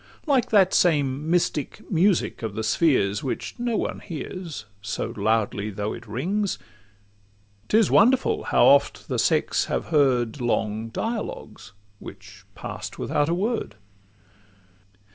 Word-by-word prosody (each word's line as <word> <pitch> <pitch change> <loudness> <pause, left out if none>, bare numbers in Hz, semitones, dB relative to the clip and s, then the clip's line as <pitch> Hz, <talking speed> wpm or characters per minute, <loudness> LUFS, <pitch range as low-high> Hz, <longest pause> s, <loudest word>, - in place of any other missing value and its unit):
Like 265 -5 +2
that 195 -4 +4
same 145 -3 +2
mystic 170 -4 -1
music 185 +1 +2
of 110 -3 -4
the 110 - -3
spheres, 110 - +2
Which 130 - -4
no 240 -2 0
one - - -3
bears, 165 - -6 0.2
so 100 +2 -4
loudly 105 -1 0
though 105 +1 -3
it 115 -1 -10
rings, 185 - -1 1.1
'Tis 220 0 +3
wonderful 265 - +3
how - - +4
oft - - +4
the - - -1
sex - - +2
have - - -3
heard 130 -5 +2
Long 110 -2 -1
dialogues—which 100 - -7
pass'd - - -7
without 150 0 0
a 170 - +1
word! 220 - -2
145 Hz, 125 wpm, -24 LUFS, -, 1.1 s, that